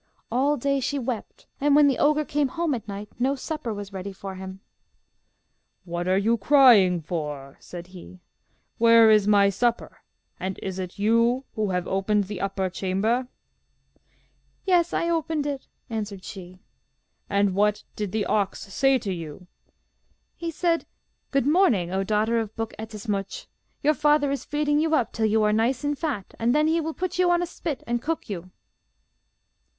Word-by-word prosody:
All 275 Hz, +5 st, +2 dB
day 275 Hz, +2 st, 0 dB
she 275 Hz, +2 st, -2 dB
wept, 245 Hz, -4 st, -5 dB
and 285 Hz, 0 st, +3 dB
when 295 Hz, -1 st, +6 dB
the 270 Hz, -, +1 dB
ogre 300 Hz, +1 st, +3 dB
came 290 Hz, -1 st, 0 dB
home 335 Hz, +1 st, -1 dB
at 225 Hz, -4 st, -5 dB
night, 205 Hz, +1 st, -6 dB
no 265 Hz, +3 st, +1 dB
supper 290 Hz, -3 st, -4 dB
was 205 Hz, -1 st, -7 dB
ready 195 Hz, +1 st, -5 dB
for 195 Hz, 0 st, -8 dB
him. 190 Hz, 0 st, -8 dB, 1.2 s
'What 175 Hz, 0 st, -4 dB
are 185 Hz, +1 st, +3 dB
you 225 Hz, +4 st, +2 dB
crying 210 Hz, -, +6 dB
for?' 150 Hz, -4 st, -5 dB
said 175 Hz, -1 st, -9 dB
he. 185 Hz, 0 st, -12 dB, 0.6 s
'Where 230 Hz, -1 st, +7 dB
is 210 Hz, -2 st, +4 dB
my 200 Hz, -1 st, +5 dB
supper, 235 Hz, +4 st, -1 dB, 0.4 s
and 190 Hz, 0 st, -4 dB
is 190 Hz, -1 st, -4 dB
it 185 Hz, -1 st, -6 dB
you 230 Hz, +5 st, +2 dB
who 215 Hz, -2 st, -1 dB
have 180 Hz, -1 st, -1 dB
opened 200 Hz, +2 st, +1 dB
the 195 Hz, -1 st, -6 dB
upper 195 Hz, -1 st, -1 dB
chamber?' 200 Hz, +7 st, -1 dB, 1.4 s
'Yes, 350 Hz, -3 st, +3 dB
I 335 Hz, -, 0 dB
opened 325 Hz, -3 st, -1 dB
it,' 280 Hz, -2 st, -4 dB, 0.2 s
answered 210 Hz, -5 st, -5 dB
she. 185 Hz, -2 st, -9 dB, 0.7 s
'And 200 Hz, -1 st, +2 dB
what 205 Hz, +2 st, +1 dB
did 210 Hz, -3 st, -3 dB
the 215 Hz, 0 st, -1 dB
ox 205 Hz, -3 st, 0 dB
say 270 Hz, +2 st, +3 dB
to 205 Hz, -6 st, -3 dB
you?' 165 Hz, 0 st, -8 dB, 0.9 s
'He 335 Hz, -, -4 dB
said, 335 Hz, +1 st, 0 dB, 0.4 s
"Good 275 Hz, -3 st, +1 dB
morning, 285 Hz, -, +3 dB
O 190 Hz, +1 st, 0 dB
daughter 215 Hz, +3 st, +1 dB
of 220 Hz, -1 st, -5 dB
Buk 225 Hz, -1 st, -4 dB
Ettemsuch. 210 Hz, -3 st, -4 dB, 0.4 s
Your 300 Hz, +2 st, +4 dB
father 295 Hz, 0 st, +2 dB
is 280 Hz, -, -3 dB
feeding 295 Hz, 0 st, +1 dB
you 320 Hz, 0 st, +2 dB
up 245 Hz, -, 0 dB
till 220 Hz, -1 st, +1 dB
you 215 Hz, 0 st, +2 dB
are 210 Hz, 0 st, +3 dB
nice 235 Hz, +5 st, +1 dB
and 290 Hz, 0 st, 0 dB
fat, 275 Hz, -, -4 dB
and 235 Hz, +4 st, +2 dB
then 300 Hz, 0 st, +3 dB
he 330 Hz, +1 st, +2 dB
will 320 Hz, 0 st, -4 dB
put 365 Hz, -1 st, -3 dB
you 360 Hz, -1 st, +4 dB
on 350 Hz, 0 st, +3 dB
a -, -, 0 dB
spit 330 Hz, -4 st, -5 dB
and 240 Hz, 0 st, -1 dB
cook 315 Hz, -6 st, -3 dB
you." 185 Hz, -1 st, -6 dB
225 Hz, 175 wpm, -25 LUFS, 195-285 Hz, 1.4 s, Where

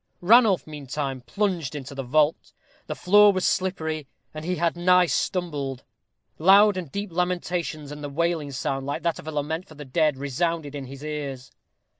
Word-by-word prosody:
Ranulph, 215 Hz, -1 st, +5 dB
meantime, 140 Hz, -3 st, -5 dB
plunged 175 Hz, -2 st, -2 dB
into 140 Hz, -1 st, -7 dB
the 135 Hz, -, -4 dB
vault. 150 Hz, +4 st, +1 dB, 0.3 s
The -, -, -4 dB
floor 205 Hz, +2 st, +6 dB
was 185 Hz, -2 st, -1 dB
slippery, 160 Hz, -6 st, -1 dB, 0.3 s
and 155 Hz, 0 st, -7 dB
he 180 Hz, +2 st, -1 dB
had 170 Hz, 0 st, 0 dB
nigh 180 Hz, +1 st, +4 dB
stumbled. 150 Hz, -7 st, -2 dB, 0.6 s
Loud 200 Hz, +4 st, +6 dB
and 175 Hz, -7 st, -5 dB
deep 200 Hz, -1 st, -4 dB
lamentations, 175 Hz, -4 st, -2 dB
and 150 Hz, 0 st, -8 dB
a 145 Hz, -, -4 dB
wailing 165 Hz, 0 st, -1 dB
sound, 135 Hz, 0 st, -3 dB
like 145 Hz, -, -3 dB
that 170 Hz, -2 st, 0 dB
of -, -, -11 dB
a -, -, -3 dB
lament 155 Hz, +4 st, -3 dB
for 155 Hz, -, -14 dB
the 145 Hz, 0 st, -9 dB
dead, 150 Hz, +1 st, +1 dB
resounded 145 Hz, +2 st, -2 dB
in 140 Hz, -2 st, -6 dB
his 135 Hz, +2 st, -10 dB
ears. 140 Hz, -4 st, -5 dB
155 Hz, 175 wpm, -25 LUFS, 140-180 Hz, 0.6 s, floor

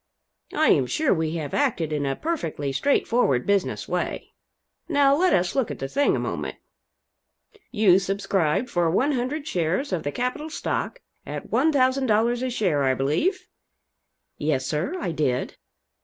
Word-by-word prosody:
I -, -, +3 dB
am -, -, +4 dB
sure 310 Hz, -3 st, +1 dB
we 160 Hz, -2 st, -1 dB
have 155 Hz, -3 st, -4 dB
acted 195 Hz, -, 0 dB
in 145 Hz, -2 st, -1 dB
a 135 Hz, -, -1 dB
perfectly 165 Hz, -, -3 dB
straight 280 Hz, -, +1 dB
forward 140 Hz, -, +2 dB
business 200 Hz, -2 st, 0 dB
way. -, -, -3 dB, 0.6 s
Now 280 Hz, -1 st, +4 dB
let 365 Hz, +4 st, +3 dB
us 175 Hz, 0 st, +2 dB
look 265 Hz, -4 st, 0 dB
at -, -, -5 dB
the 135 Hz, -, -4 dB
thing 285 Hz, -, +2 dB
a -, -, -1 dB
moment. -, -, -4 dB, 1.1 s
You 205 Hz, -5 st, +4 dB
subscribed 195 Hz, 0 st, 0 dB
for 175 Hz, -5 st, +1 dB
100 270 Hz, -, 0 dB
shares 185 Hz, -, -1 dB
of 175 Hz, -, 0 dB
the 145 Hz, -, -3 dB
capital 255 Hz, -, -3 dB
stock, -, -, -3 dB, 0.2 s
at -, -, -7 dB
$1,000 255 Hz, -5 st, +2 dB
a 255 Hz, -, -1 dB
share, 185 Hz, -, 0 dB
I 130 Hz, -1 st, +2 dB
believe?" 310 Hz, -, 0 dB, 0.9 s
"Yes, 145 Hz, -4 st, 0 dB
sir, 155 Hz, -, -2 dB
I 175 Hz, -, -2 dB
did." 140 Hz, -5 st, -1 dB
200 Hz, 155 wpm, -24 LUFS, -, 1.1 s, am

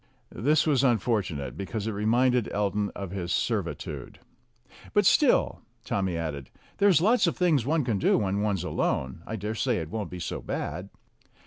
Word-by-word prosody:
This 150 Hz, +6 st, +2 dB
was 140 Hz, -4 st, +2 dB
unfortunate, 105 Hz, -, 0 dB
because 100 Hz, +2 st, -4 dB
it 110 Hz, -, -1 dB
reminded 120 Hz, +3 st, +2 dB
Elton 105 Hz, 0 st, 0 dB
of 100 Hz, -3 st, -6 dB
his 90 Hz, -2 st, -4 dB
servitude. -, -, -2 dB, 0.8 s
"But -, -, +4 dB
still," -, -, +3 dB, 0.2 s
Tommy 95 Hz, -4 st, -1 dB
added, 75 Hz, -5 st, -4 dB, 0.3 s
"there's 200 Hz, -5 st, +5 dB
lots 220 Hz, +1 st, +4 dB
of 170 Hz, -, -1 dB
things 155 Hz, -9 st, +2 dB
one 155 Hz, 0 st, +2 dB
can 110 Hz, -5 st, 0 dB
do -, -, +3 dB
when 100 Hz, -1 st, 0 dB
one's 100 Hz, -4 st, 0 dB
alone. 80 Hz, -4 st, -1 dB
I 110 Hz, -, -3 dB
dare 105 Hz, +1 st, -3 dB
say 120 Hz, +1 st, 0 dB
it 80 Hz, -1 st, -5 dB
won't 105 Hz, -5 st, -3 dB
be 90 Hz, -, -7 dB
so -, -, -4 dB
bad." 90 Hz, +6 st, -4 dB
105 Hz, 165 wpm, -27 LUFS, 95-125 Hz, 0.8 s, there's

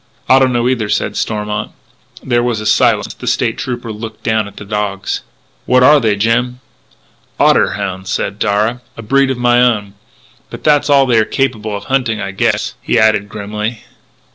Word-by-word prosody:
"I 130 Hz, -, +6 dB
don't 130 Hz, -1 st, +3 dB
know 120 Hz, 0 st, +1 dB
either," 120 Hz, -5 st, -1 dB
said -, -, -1 dB
Stormont. 105 Hz, -1 st, -3 dB, 0.5 s
There 120 Hz, -2 st, +1 dB
was 120 Hz, -2 st, -1 dB
a 110 Hz, -, -6 dB
silence; -, -, +2 dB
the -, -, -10 dB
State -, -, 0 dB
Trooper 120 Hz, -3 st, -4 dB
looked 110 Hz, +1 st, -8 dB
down 110 Hz, -2 st, 0 dB
at 100 Hz, -, -14 dB
the 100 Hz, -, -9 dB
dogs: 100 Hz, -2 st, -3 dB, 0.5 s
"What 125 Hz, 0 st, +4 dB
are 150 Hz, +3 st, +7 dB
they, 110 Hz, -5 st, +1 dB
Jim?" 120 Hz, +4 st, 0 dB, 0.8 s
"Otter -, -, +4 dB
hounds," 95 Hz, -2 st, -5 dB
said 100 Hz, +1 st, -2 dB
Darragh, 110 Hz, +4 st, 0 dB
" -, -, -35 dB
a 115 Hz, -, -8 dB
breed 135 Hz, +5 st, +2 dB
of 130 Hz, -, -2 dB
my 120 Hz, 0 st, +3 dB
own.... 105 Hz, -5 st, +1 dB, 0.6 s
But -, -, -9 dB
that's 150 Hz, -1 st, +3 dB
all 140 Hz, -1 st, +5 dB
they 120 Hz, -3 st, +3 dB
are -, -, +4 dB
capable 110 Hz, -4 st, -2 dB
of 100 Hz, -, -9 dB
hunting, 125 Hz, -4 st, -1 dB
I 100 Hz, -, -4 dB
guess," 95 Hz, -, 0 dB
he -, -, 0 dB
added 110 Hz, -2 st, +2 dB
grimly. 105 Hz, +2 st, -5 dB
110 Hz, 190 wpm, -15 LUFS, 105-125 Hz, 0.8 s, are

